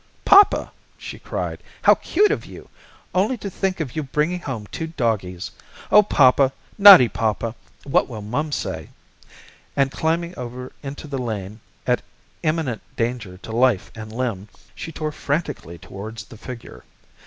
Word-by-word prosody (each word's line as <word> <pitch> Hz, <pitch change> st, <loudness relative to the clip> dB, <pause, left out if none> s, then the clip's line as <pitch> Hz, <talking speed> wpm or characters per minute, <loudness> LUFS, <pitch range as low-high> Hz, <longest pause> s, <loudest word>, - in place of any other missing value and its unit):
"Poppa," 400 Hz, +1 st, +6 dB, 0.3 s
she -, -, -8 dB
cried, -, -, -4 dB, 0.2 s
"how -, -, +8 dB
cute 410 Hz, +4 st, +2 dB
of -, -, -1 dB
you! -, -, -12 dB, 0.4 s
Only 205 Hz, +8 st, +1 dB
to 200 Hz, -2 st, -6 dB
think 190 Hz, 0 st, -1 dB
of 145 Hz, -7 st, -4 dB
you 155 Hz, -, 0 dB
bringing 150 Hz, +5 st, -1 dB
home 130 Hz, -10 st, -5 dB
two 160 Hz, -, -4 dB
doggies! 110 Hz, -, -2 dB, 0.4 s
Oh, 210 Hz, -, +9 dB
Poppa, 135 Hz, -7 st, +4 dB, 0.3 s
naughty 195 Hz, -11 st, +11 dB
Poppa, 110 Hz, 0 st, -1 dB, 0.3 s
what 135 Hz, -, +1 dB
will 110 Hz, -4 st, -7 dB
mum 145 Hz, +9 st, -2 dB
say?" -, -, -4 dB, 0.9 s
and 135 Hz, -1 st, +2 dB
climbing 170 Hz, +3 st, -1 dB
over 125 Hz, +1 st, -7 dB
into 140 Hz, +1 st, -7 dB
the 140 Hz, -3 st, -4 dB
lane 110 Hz, -3 st, -4 dB, 0.3 s
at -, -, +2 dB, 0.4 s
imminent 155 Hz, -7 st, -1 dB
danger 115 Hz, -6 st, -3 dB
to 110 Hz, -, -10 dB
life 120 Hz, -3 st, +2 dB
and 110 Hz, -1 st, -9 dB
limb, 110 Hz, -5 st, -3 dB, 0.3 s
she 165 Hz, -, -7 dB
tore 155 Hz, 0 st, -3 dB
frantically 145 Hz, -, -3 dB
towards 100 Hz, +6 st, -8 dB
the 115 Hz, -, -14 dB
figure. 125 Hz, +1 st, -10 dB
130 Hz, 150 wpm, -22 LUFS, 110-160 Hz, 0.9 s, naughty